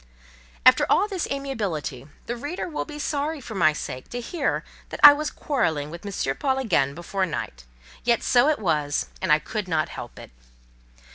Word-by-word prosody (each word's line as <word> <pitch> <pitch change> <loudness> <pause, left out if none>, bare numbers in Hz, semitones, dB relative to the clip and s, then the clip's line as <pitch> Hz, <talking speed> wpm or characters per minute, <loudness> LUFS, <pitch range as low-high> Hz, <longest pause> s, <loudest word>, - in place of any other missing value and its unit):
After - - +7
all 405 - +4
this 385 -5 -3
amiability, 200 - -3 0.2
the 240 - -3
reader 290 +11 -4
will 315 - -4
be 300 -1 -9
sorry 295 +1 -2
for 235 -4 -9
my 170 -6 +4
sake 130 -4 -6
to 245 - -4
hear 285 +5 -2 0.3
that - - -7
I 290 - +12
was 300 +1 -2
quarrelling 160 - -1
with 170 +1 -9
M. 185 -9 -2
Paul 265 -2 0
again 145 - +1
before 185 +3 -2
night; 60 - -5 0.4
yet 235 -1 +2
so 250 +4 +4
it 310 - +2
was, 150 -7 0 0.2
and 190 - 0
I 150 - +7
could 205 +6 -5
not 160 -3 0
help - - -9
it. - - -11
215 Hz, 185 wpm, -24 LUFS, -, 0.4 s, I